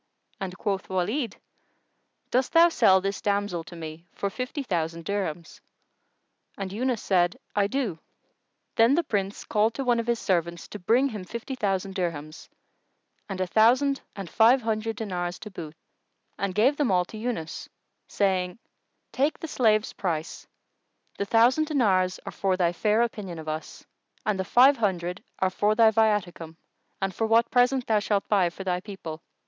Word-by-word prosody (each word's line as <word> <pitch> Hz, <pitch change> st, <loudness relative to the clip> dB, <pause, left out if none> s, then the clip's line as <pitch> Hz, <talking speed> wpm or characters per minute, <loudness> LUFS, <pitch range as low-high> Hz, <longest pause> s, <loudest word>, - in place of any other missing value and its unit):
and 190 Hz, -2 st, -5 dB
quoth 195 Hz, -2 st, -2 dB
Walid, 205 Hz, +7 st, -1 dB, 1.0 s
"Dost 255 Hz, +1 st, +1 dB
thou 335 Hz, +1 st, +7 dB
sell 195 Hz, -, +4 dB
this 195 Hz, +1 st, -3 dB
damsel 200 Hz, -4 st, -1 dB
to 175 Hz, -, -11 dB
me 160 Hz, +1 st, -8 dB
for 200 Hz, -, -3 dB
fifty 255 Hz, +6 st, -4 dB
thousand 165 Hz, -6 st, -2 dB
dirhams?" 175 Hz, -5 st, -4 dB, 1.0 s
And 195 Hz, -1 st, -5 dB
Yunus 245 Hz, +1 st, -1 dB
said, 175 Hz, -2 st, +2 dB, 0.2 s
"I 200 Hz, -1 st, +3 dB
do." 220 Hz, -9 st, -2 dB, 0.8 s
Then 230 Hz, +4 st, +5 dB
the 340 Hz, -, +2 dB
Prince 200 Hz, -7 st, -2 dB
called 220 Hz, +1 st, +1 dB
to 275 Hz, -, -2 dB
one 240 Hz, -2 st, +2 dB
of 230 Hz, -, -3 dB
his 235 Hz, 0 st, +2 dB
servants 170 Hz, -5 st, -1 dB
to 210 Hz, -, -7 dB
bring 240 Hz, +9 st, +3 dB
him 210 Hz, -6 st, -6 dB
fifty 235 Hz, +7 st, -6 dB
thousand 195 Hz, -5 st, -1 dB
dirhams 165 Hz, -4 st, -4 dB, 0.8 s
and 195 Hz, -1 st, -4 dB
a 185 Hz, -, +1 dB
thousand 250 Hz, +9 st, +3 dB
and 195 Hz, -3 st, -6 dB
five 235 Hz, +7 st, +4 dB
hundred 220 Hz, 0 st, -1 dB
dinars 180 Hz, -5 st, -3 dB
to 210 Hz, -, -8 dB
boot, 160 Hz, -4 st, -8 dB, 0.6 s
and 195 Hz, -2 st, -3 dB
gave 260 Hz, +7 st, +3 dB
them 290 Hz, -5 st, +1 dB
all 180 Hz, -2 st, +3 dB
to 215 Hz, -, -10 dB
Yunus, 215 Hz, -9 st, -4 dB, 0.4 s
saying, 185 Hz, -3 st, 0 dB, 0.5 s
"Take 285 Hz, +4 st, +1 dB
the 325 Hz, -, -6 dB
slave's 220 Hz, -6 st, +2 dB
price: 165 Hz, -4 st, -4 dB, 0.7 s
the 200 Hz, -, 0 dB
thousand 240 Hz, +9 st, +4 dB
dinars 190 Hz, -, +2 dB
are -, -, -5 dB
for 190 Hz, -2 st, 0 dB
thy 175 Hz, -2 st, +2 dB
fair 215 Hz, +5 st, +2 dB
opinion 205 Hz, -7 st, -4 dB
of 160 Hz, -1 st, -9 dB
us 155 Hz, +1 st, -6 dB, 0.4 s
and 210 Hz, -3 st, 0 dB
the 190 Hz, -, -1 dB
five 265 Hz, +6 st, +6 dB
hundred 180 Hz, -4 st, -1 dB
are 190 Hz, 0 st, +1 dB
for 210 Hz, +3 st, +1 dB
thy 225 Hz, -1 st, +6 dB
viaticum 205 Hz, -7 st, 0 dB, 0.4 s
and 195 Hz, 0 st, -2 dB
for 225 Hz, +5 st, -1 dB
what 230 Hz, +1 st, +3 dB
present 250 Hz, +1 st, +3 dB
thou 220 Hz, -2 st, +2 dB
shalt 205 Hz, -1 st, -1 dB
buy 195 Hz, -4 st, +3 dB
for 185 Hz, +3 st, -9 dB
thy 180 Hz, -1 st, 0 dB
people. 180 Hz, -5 st, -8 dB
200 Hz, 165 wpm, -26 LUFS, 180-230 Hz, 1.0 s, thou